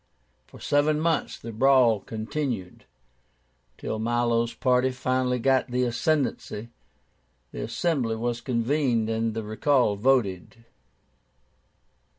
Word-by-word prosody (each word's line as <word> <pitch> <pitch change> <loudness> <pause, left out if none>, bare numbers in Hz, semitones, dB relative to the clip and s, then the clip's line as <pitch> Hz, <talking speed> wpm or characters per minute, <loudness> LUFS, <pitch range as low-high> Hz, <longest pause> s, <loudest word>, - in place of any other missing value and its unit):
For - - -15
seven 150 +1 +1
months 165 +1 0
the 115 - -8
brawl 125 -2 +4
continued, 110 -1 -5 0.9
till 110 - -4
Milo's 120 0 +1
party 125 0 +2
finally 130 0 0
got 130 +2 +2
the 125 +1 0
ascendancy; 125 -4 -1 0.8
the - - -6
Assembly 135 -10 -1
was 120 +1 -3
convened, 120 -2 0
and 115 0 -1
the 110 - -3
recall 110 +1 +1
voted. 115 - 0
120 Hz, 105 wpm, -26 LUFS, 115-135 Hz, 0.9 s, brawl